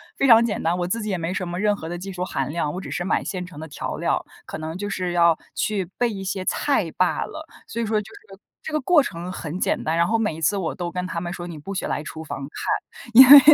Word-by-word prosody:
非 275 Hz, -, +2 dB
常 230 Hz, -1 st, +8 dB
简 220 Hz, -, -2 dB
单， 170 Hz, +2 st, +1 dB
我 175 Hz, -1 st, -1 dB
自 230 Hz, +6 st, -1 dB
己 215 Hz, -, -3 dB
也 190 Hz, -, 0 dB
没 165 Hz, +2 st, -2 dB
什 185 Hz, -2 st, -2 dB
么 175 Hz, +1 st, -4 dB
任 210 Hz, 0 st, +2 dB
何 160 Hz, -4 st, -7 dB
的 175 Hz, -, -4 dB
技 195 Hz, +3 st, -6 dB
术 180 Hz, -, -3 dB
含 135 Hz, -7 st, -2 dB
量， 150 Hz, -2 st, -1 dB
我 180 Hz, -, -5 dB
只 -, -, -7 dB
是 175 Hz, -, -2 dB
买 190 Hz, -, +1 dB
现 185 Hz, -2 st, -3 dB
成 180 Hz, -5 st, -11 dB
的 160 Hz, -, -6 dB
调 145 Hz, -, -5 dB
料， -, -, 0 dB, 0.2 s
可 -, -, -6 dB
能 160 Hz, +2 st, -5 dB
就 205 Hz, +1 st, -4 dB
是 180 Hz, -2 st, -2 dB
要 170 Hz, -2 st, +5 dB, 0.2 s
去 200 Hz, -4 st, 0 dB
备 245 Hz, -1 st, +2 dB
一 195 Hz, -2 st, -5 dB
些 190 Hz, 0 st, -3 dB
菜 -, -, +1 dB
罢 -, -, +2 dB
了， -, -, -8 dB, 0.2 s
所 235 Hz, -, -3 dB
以 -, -, 0 dB
说 215 Hz, 0 st, +1 dB
就 210 Hz, -, -13 dB
是 415 Hz, +2 st, -15 dB, 0.2 s
这 315 Hz, -, -6 dB
个 305 Hz, -, +1 dB
过 300 Hz, +1 st, +5 dB
程 175 Hz, -2 st, -5 dB
很 170 Hz, 0 st, -5 dB
简 -, -, 0 dB
单。 160 Hz, -, 0 dB
然 170 Hz, 0 st, +3 dB
后 225 Hz, +4 st, +2 dB
每 210 Hz, -8 st, 0 dB
一 165 Hz, -, -9 dB
次 180 Hz, +6 st, +2 dB
我 185 Hz, -4 st, -2 dB
都 175 Hz, -2 st, -4 dB
跟 180 Hz, +1 st, -3 dB
他 170 Hz, -2 st, -3 dB
们 175 Hz, 0 st, -4 dB
说 175 Hz, -1 st, -6 dB
你 165 Hz, -3 st, -7 dB
不 195 Hz, +7 st, -6 dB
许 -, -, -2 dB
来 -, -, -1 dB
厨 160 Hz, +1 st, -7 dB
房 155 Hz, -, -6 dB
看， 235 Hz, -, -4 dB
因 255 Hz, +2 st, +10 dB
为 285 Hz, +1 st, +14 dB
185 Hz, 315 characters per minute, -23 LUFS, 170-210 Hz, 0.2 s, 为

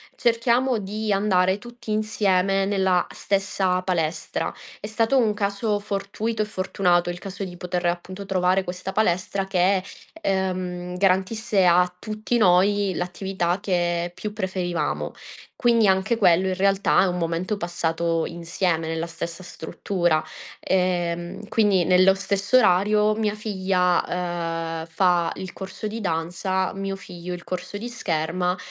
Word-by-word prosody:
cerchiamo 235 Hz, +2 st, +2 dB
di 210 Hz, +1 st, -3 dB
andare 190 Hz, -2 st, +2 dB
tutti 240 Hz, +1 st, -12 dB
insieme 195 Hz, -3 st, +1 dB
nella 190 Hz, -2 st, +2 dB
stessa 195 Hz, -2 st, 0 dB
palestra. 165 Hz, -3 st, -2 dB, 0.3 s
È -, -, -7 dB
stato 225 Hz, +5 st, +1 dB
un 220 Hz, -4 st, +3 dB
caso 205 Hz, +1 st, -1 dB
fortuito 210 Hz, +2 st, -2 dB
e -, -, -4 dB
fortunato 185 Hz, -3 st, +1 dB
il 175 Hz, -, -4 dB
caso 195 Hz, +2 st, -6 dB
di 180 Hz, -2 st, -7 dB
poter, 180 Hz, -1 st, -2 dB
appunto, 185 Hz, +3 st, -4 dB
trovare 185 Hz, 0 st, +2 dB
questa 185 Hz, +1 st, -5 dB
palestra 190 Hz, -1 st, 0 dB
che, 190 Hz, 0 st, +2 dB, 0.4 s
ehm, 185 Hz, -, -2 dB
garantisse 195 Hz, +2 st, +2 dB
a 180 Hz, +1 st, +4 dB
tutti 215 Hz, +4 st, -2 dB
noi 200 Hz, 0 st, +4 dB
l'attività 180 Hz, 0 st, -2 dB
che 175 Hz, -3 st, 0 dB
più 210 Hz, +3 st, -5 dB
preferivamo. 185 Hz, -4 st, -2 dB, 0.4 s
Quindi, 230 Hz, -4 st, +3 dB
anche 190 Hz, +5 st, +2 dB
quello 190 Hz, -2 st, +4 dB
in 185 Hz, -, 0 dB
realtà 195 Hz, +1 st, +3 dB
è 190 Hz, -, +3 dB
un 180 Hz, 0 st, -1 dB
momento 170 Hz, +5 st, -1 dB
passato 170 Hz, -2 st, -1 dB
insieme 170 Hz, -1 st, -1 dB
nella 165 Hz, +1 st, -2 dB
stessa 170 Hz, +1 st, -6 dB
struttura. 175 Hz, -1 st, -1 dB, 0.4 s
Ehm, 175 Hz, +1 st, -1 dB
quindi 205 Hz, -5 st, +3 dB
nello 185 Hz, +2 st, +5 dB
stesso 200 Hz, +4 st, +1 dB
orario 210 Hz, 0 st, +4 dB
mia 215 Hz, -1 st, 0 dB
figlia, 200 Hz, -3 st, -5 dB, 0.4 s
dhm, 165 Hz, -2 st, -3 dB
fa 175 Hz, -1 st, +2 dB
il 185 Hz, -1 st, -6 dB
corso 195 Hz, +3 st, -6 dB
di 225 Hz, +2 st, -5 dB
danza, 185 Hz, +2 st, -1 dB
mio 195 Hz, 0 st, -3 dB
figlio 180 Hz, -2 st, -8 dB
il 175 Hz, -1 st, -7 dB
corso 185 Hz, +2 st, -5 dB
di 235 Hz, +4 st, -6 dB
scherma, 180 Hz, -4 st, -1 dB
190 Hz, 135 wpm, -24 LUFS, 175-205 Hz, 0.4 s, nello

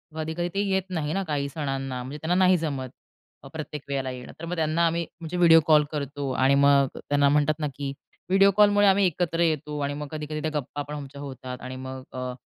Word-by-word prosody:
कधी-कधी 160 Hz, +2 st, -3 dB
ते 195 Hz, -, -1 dB
येत 190 Hz, 0 st, +2 dB
नाही 160 Hz, -4 st, -2 dB
ना, 195 Hz, -, 0 dB
काही 145 Hz, -5 st, -2 dB
सणांना, 135 Hz, -3 st, -3 dB
म्हणजे 135 Hz, +4 st, -7 dB
त्यांना 170 Hz, +3 st, 0 dB
नाही 185 Hz, 0 st, +5 dB
जमत. 140 Hz, -6 st, -3 dB, 0.5 s
अ, -, -, -10 dB
प्रत्येक 150 Hz, -2 st, -6 dB
वेळेला 135 Hz, -2 st, -1 dB
येणं. 125 Hz, -1 st, -8 dB
तर 165 Hz, -, -6 dB
मग 175 Hz, +1 st, -3 dB
त्यांना 160 Hz, +1 st, +1 dB
आम्ही 170 Hz, +1 st, -1 dB, 0.2 s
म्हणजे 165 Hz, +2 st, -4 dB
व्हिडिओ 165 Hz, -2 st, +7 dB
कॉल 155 Hz, -2 st, +6 dB
करतो 140 Hz, -2 st, -3 dB
आणि 130 Hz, +2 st, +3 dB
मग 140 Hz, -1 st, +5 dB
त्यांना 145 Hz, 0 st, +2 dB
म्हणतात 150 Hz, +2 st, +2 dB
ना 150 Hz, -, -1 dB
की 140 Hz, 0 st, -4 dB, 0.4 s
व्हिडिओ 195 Hz, +1 st, +5 dB
कॉलमुळे 205 Hz, -1 st, +5 dB
आम्ही 195 Hz, 0 st, +4 dB
एकत्र 170 Hz, -1 st, -1 dB
येतो 150 Hz, -2 st, 0 dB
आणि 140 Hz, 0 st, -1 dB
मग 145 Hz, 0 st, -5 dB
कधी-कधी 155 Hz, 0 st, -4 dB
त्या 155 Hz, -, -2 dB
गप्पा 145 Hz, +2 st, -6 dB
पण 145 Hz, +1 st, -7 dB
आमच्या 140 Hz, -1 st, -8 dB
होतात 130 Hz, -2 st, -7 dB
आणि 130 Hz, 0 st, -6 dB
मग 130 Hz, 0 st, -7 dB
अ, 125 Hz, 0 st, -4 dB
150 Hz, 215 wpm, -26 LUFS, 140-165 Hz, 0.5 s, व्हिडिओ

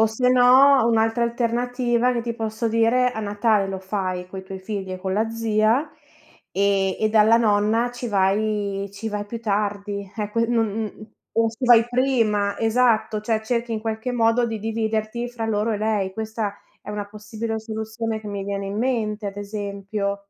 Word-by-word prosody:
O 220 Hz, -, +6 dB
se 235 Hz, +3 st, 0 dB
no, 255 Hz, +1 st, +6 dB
un'altra 225 Hz, +1 st, +2 dB
alternativa 240 Hz, +1 st, 0 dB
che 240 Hz, -, -1 dB
ti 235 Hz, 0 st, -3 dB
posso 225 Hz, 0 st, -2 dB
dire 230 Hz, +3 st, +3 dB
a 230 Hz, -, -7 dB
Natale 205 Hz, 0 st, +1 dB
lo 190 Hz, -1 st, -4 dB
fai 185 Hz, -2 st, -3 dB
coi 190 Hz, 0 st, -7 dB
tuoi 190 Hz, 0 st, -7 dB
figli 190 Hz, -1 st, -5 dB
e 185 Hz, -, -5 dB
con 190 Hz, 0 st, -3 dB
la 220 Hz, +3 st, +1 dB
zia, 225 Hz, +5 st, +1 dB, 0.6 s
e 195 Hz, -1 st, +1 dB
e 215 Hz, -, +2 dB
dalla 215 Hz, +1 st, +5 dB
nonna 220 Hz, +1 st, +2 dB
ci 245 Hz, 0 st, -5 dB
vai 200 Hz, 0 st, 0 dB
ci 210 Hz, +3 st, -5 dB
vai 210 Hz, -1 st, -3 dB
più 230 Hz, +2 st, -6 dB
tardi, 205 Hz, -2 st, -2 dB
eh 210 Hz, -1 st, -3 dB
qui 230 Hz, +2 st, +1 dB
non 230 Hz, -2 st, +2 dB
non 215 Hz, +1 st, -6 dB, 0.2 s
o 225 Hz, -, +3 dB
ci 230 Hz, +4 st, -5 dB
vai 240 Hz, -2 st, +7 dB
prima, 230 Hz, -6 st, +1 dB
esatto, 225 Hz, -2 st, +2 dB
cioè 220 Hz, +1 st, 0 dB
cerchi 235 Hz, +1 st, -2 dB
in 220 Hz, -, -2 dB
qualche 220 Hz, +2 st, -3 dB
modo 230 Hz, 0 st, +3 dB
di 225 Hz, -1 st, -3 dB
dividerti 220 Hz, +2 st, -2 dB
fra 235 Hz, -2 st, -4 dB
loro 215 Hz, 0 st, 0 dB
e -, -, -1 dB
lei. 210 Hz, -3 st, 0 dB
Questa 220 Hz, 0 st, -3 dB, 0.3 s
è -, -, -8 dB
una 210 Hz, -1 st, -4 dB
possibile 215 Hz, +2 st, -5 dB
soluzione 220 Hz, 0 st, -4 dB
che 215 Hz, -, -11 dB
mi 200 Hz, -1 st, -4 dB
viene 200 Hz, 0 st, -3 dB
in 200 Hz, +1 st, -4 dB
mente 220 Hz, -4 st, -1 dB
ad 200 Hz, 0 st, -5 dB
esempio. 200 Hz, -1 st, -4 dB
220 Hz, 185 wpm, -23 LUFS, 205-230 Hz, 0.6 s, vai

